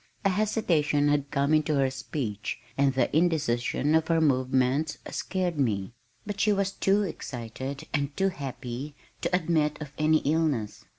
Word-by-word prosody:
A - - +5
hesitation 175 -8 +2
had 145 -1 +1
come 140 +2 +1
into 155 0 +3
her 135 -1 +2
speech, 125 -5 -4 0.2
and 140 -1 +2
the 135 - +1
indecision 150 -4 +1
of 160 0 +3
her 165 -1 +3
movements 130 +1 +2
scared 180 -5 -2
me, 105 -5 0 0.3
but 205 -1 -5
she 210 - +3
was 195 -1 +1
too 195 +1 +2
excited 130 - -5
and 140 -1 -1
too 195 0 +3
happy 135 -2 -6 0.3
to - - +1
admit 155 -4 +1
of 150 -2 -8
any 155 +1 +4
illness. 145 -8 0
150 Hz, 155 wpm, -27 LUFS, 135-165 Hz, 0.3 s, A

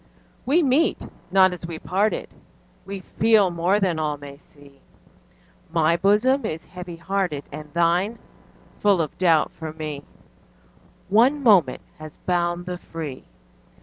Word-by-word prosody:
We 325 +6 +4
meet 285 +4 +2 0.3
not 185 -1 +5
as 175 -1 -7
we 165 -2 -6
parted, 195 +6 -1 0.6
We 195 -1 -6
feel 210 -1 +3
more 175 +4 +1
than 180 -5 0
all 150 -1 -1
may 140 -1 -10
see; 145 -2 -20 0.9
My 165 0 +3
bosom 210 +9 +3
is 160 +1 -4
heavy 180 -1 -9
hearted, 175 -4 -2
And 150 +1 -9
thine 175 +6 +1 0.6
full 200 -3 +3
of 155 -3 -2
doubt 165 -4 +3
for 160 -1 -7
me: 155 -2 -6 1.1
One 255 +8 +4
moment 190 - +4 0.2
has 155 -1 -10
bound 175 -1 -1
the 180 -1 -5
free. 155 -7 -7
175 Hz, 135 wpm, -23 LUFS, 155-200 Hz, 1.1 s, not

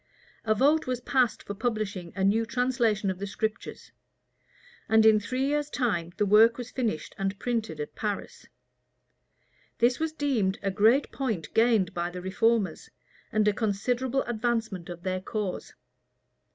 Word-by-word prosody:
A 215 0 +2
vote 290 +7 +3
was 250 -1 -1
passed 250 -1 +1
for 200 - -5
publishing 205 -5 -3
a 195 - -1
new 210 +4 +3
translation 235 -4 0
of 185 - -7
the 200 - -4
Scriptures; 220 +2 -4 1.0
and 220 0 +5
in 220 -1 +6
three 255 +6 -2
years' 295 +1 0
time 200 - -1
the 210 - +2
work 220 +3 +6
was 245 -1 -7
finished, 225 -11 -2
and 195 0 -1
printed 225 -9 -2
at 150 - -5
Paris. 220 - -5 1.3
This 240 +1 +2
was 320 0 -1
deemed 250 -11 0
a 195 - 0
great 220 +8 +3
point 225 - -3
gained 225 -5 +3
by 175 -1 -2
the 180 +1 -7
reformers, 195 0 0 0.4
and 215 0 +2
a 210 - +4
considerable 245 +5 0
advancement 225 -6 -2
of 175 -1 -8
their 185 0 -2
cause. 205 -2 -4
220 Hz, 150 wpm, -27 LUFS, 195-245 Hz, 1.3 s, in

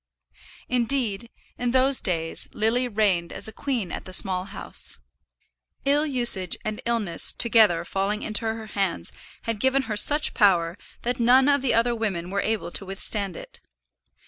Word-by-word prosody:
Indeed, 235 -3 -1 0.3
in 245 - -1
those 260 +2 +2
days 165 -3 -3
Lily 230 +4 +1
reigned 200 -7 0
as - - -2
a 220 - -8
queen 240 -10 -3
at - - -6
the 185 - -9
Small 185 -1 +2
House. 205 +1 -4 0.9
Ill 290 +2 +2
usage 240 - +3
and 215 0 -4
illness 215 -8 +1
together 215 -8 +4
falling 195 +4 -2
into 215 +1 -1
her 220 0 -4
hands 195 - -2 0.3
had 230 -2 -3
given 265 +3 +1
her 220 -4 -4
such 295 +8 +5
power, 175 -6 +2 0.3
that 245 +1 -2
none 255 +3 +5
of 285 -1 +3
the 265 - +1
other 235 +1 +2
women 190 -6 -3
were 200 0 -1
able 220 -4 -2
to - - -4
withstand 195 -1 -2
it. - - -11
220 Hz, 160 wpm, -24 LUFS, 195-245 Hz, 0.9 s, such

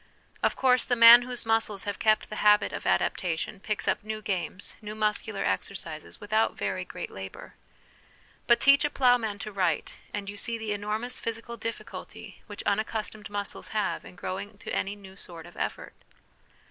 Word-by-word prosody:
Of - - +2
course, 255 -2 +4
the 245 - +1
man 235 +1 +11
whose 245 -1 -5
muscles 225 -3 +1
have 205 -1 -4
kept 215 -1 +2
the - - -4
habit 210 0 +4
of - - -4
adaptation 180 +4 0
picks 210 +1 -3
up - - +1
new 215 0 -4
games, 190 -2 -4
new 210 0 -6
muscular 215 -1 -1
exercises, 160 -5 -3
without 215 +2 +1
very 185 -1 -2
great 180 0 -7
labour. 95 0 -9 0.9
But 235 - +6
teach 275 0 +6
a 295 - +2
ploughman 245 -7 +3
to 215 +2 -6
write, 180 -6 0 0.2
and 205 -1 -4
you 205 +1 -6
see 230 +2 -3
the 220 -2 -2
enormous 215 +5 -2
physical 230 +1 -4
difficulty 230 0 -7
which 205 -2 -7
unaccustomed 215 +1 -2
muscles 205 -1 -4
have 210 - 0
in - - -12
growing 200 +3 -5
to - - -7
any 200 +1 -1
new 195 -2 -13
sort 170 -4 -10
of 175 - -14
effort. - - -4
210 Hz, 170 wpm, -28 LUFS, 195-225 Hz, 0.9 s, man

